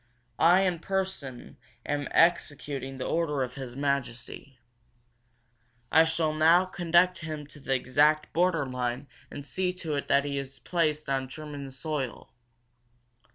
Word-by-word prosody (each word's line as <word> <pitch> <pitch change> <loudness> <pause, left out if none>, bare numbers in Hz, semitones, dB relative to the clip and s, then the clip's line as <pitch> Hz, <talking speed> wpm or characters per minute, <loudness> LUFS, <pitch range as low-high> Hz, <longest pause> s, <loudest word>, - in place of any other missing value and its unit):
I 175 +3 +6
in 180 -3 0
person 185 -10 -4 0.3
am 145 -2 -2
executing 145 -5 +1
the 130 - -4
order 150 -5 0
of 125 -1 -5
His 130 -3 -7
Majesty. 135 -1 -3 1.3
I 160 +1 +6
shall 160 -1 0
now 165 +4 +5
conduct 180 0 +2
him 155 -2 -6
to 145 +1 -12
the 135 -1 -1
exact 150 +4 +2
border 170 -4 +2
line 125 +1 -3 0.2
and 145 - -8
see 185 +3 -1
to 170 -4 -5
it 140 - -2
that 140 0 +3
he 140 -1 -2
is 135 0 -7
placed 155 -4 -1
on 135 -1 -1
German 145 -1 -7
soil. 135 -1 -5
150 Hz, 140 wpm, -28 LUFS, 135-165 Hz, 1.3 s, I